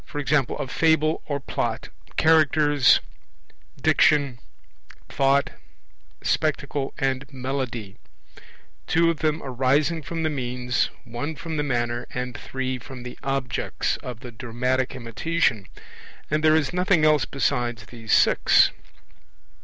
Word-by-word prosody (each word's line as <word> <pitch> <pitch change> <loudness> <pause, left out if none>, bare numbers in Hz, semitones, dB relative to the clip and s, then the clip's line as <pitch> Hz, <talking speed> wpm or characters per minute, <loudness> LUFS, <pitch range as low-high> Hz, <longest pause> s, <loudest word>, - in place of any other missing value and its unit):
a - - -3
Fable 160 +3 +2
or 145 -2 -2
Plot, - - -3 0.3
Characters, 150 -4 +4 0.8
Diction, 140 -5 +3 0.7
Thought, 140 0 +2 0.7
Spectacle 140 -2 -1
and 135 +1 -2
Melody; 130 -6 -4 0.9
two 165 +1 +3
of 160 - -6
them 155 +1 0
arising 140 +5 +1
from 165 +2 -4
the 155 - +1
means, 125 -2 -1
one 125 +6 -5
from 160 0 -5
the - - +1
manner, 120 -4 -1
and 125 -1 -3
three 130 0 -4
from 130 -2 -10
the 125 - -8
objects 135 -2 -2
of 125 -2 -8
the 125 -2 -8
dramatic 125 +2 -2
imitation; 120 - -1 0.6
and 155 0 +1
there 155 0 +5
is 160 +1 +1
nothing 180 -3 +3
else 150 -3 +4
besides 120 -5 -1
these 115 -1 -8
six. - - +5
135 Hz, 115 wpm, -24 LUFS, 125-155 Hz, 0.9 s, there